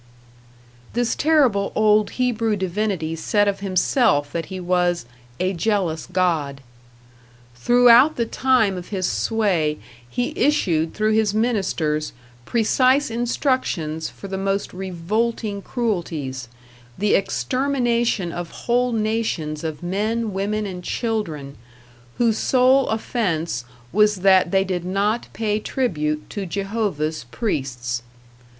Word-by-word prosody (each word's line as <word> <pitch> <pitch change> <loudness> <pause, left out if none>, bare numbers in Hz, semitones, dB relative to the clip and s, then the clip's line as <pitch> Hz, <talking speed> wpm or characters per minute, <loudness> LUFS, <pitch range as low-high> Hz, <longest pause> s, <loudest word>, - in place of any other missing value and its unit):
This 240 0 +1
terrible 270 -11 +2
old 215 -1 +4
Hebrew 230 -3 +1
divinity 190 -4 -2
said 205 +5 +1
of 200 - 0
himself 185 - +2
that 165 -2 -3
he 190 -1 -6
was 175 -3 +1 0.3
"a 185 +1 0
jealous 180 -4 -1
god". 160 -7 0 0.9
Throughout 245 - +6
the 235 - 0
time 230 -5 +2
of 180 - -7
his 190 -3 -1
sway 185 -9 0 0.3
he 245 - -2
issued 170 - +1
through 215 0 +1
his 215 -1 +2
ministers 185 -10 0 0.3
precise 255 - +2
instructions 230 - -1
for 200 - -10
the 190 0 -4
most 195 +1 -1
revolting 200 +4 -2
cruelties, 165 - -3 0.5
the 205 +1 +1
extermination 240 -4 0
of 175 -1 -5
whole 245 0 0
nations 215 -9 -1
of 155 -1 -5
men, 215 +4 -1
women 210 +2 -1
and 180 -2 -6
children, 165 - -3 0.6
whose 230 -2 +2
sole 260 +1 +4
offense 170 - -1 0.3
was 210 +1 +4
that 190 -2 +6
they 195 +1 +3
did 185 -2 -3
not 200 +5 0
pay 215 -2 -1
tribute 150 - -2
to 200 -2 -4
Jehovah's 195 - -2
priests. 125 - -2
200 Hz, 115 wpm, -22 LUFS, 170-230 Hz, 0.9 s, Throughout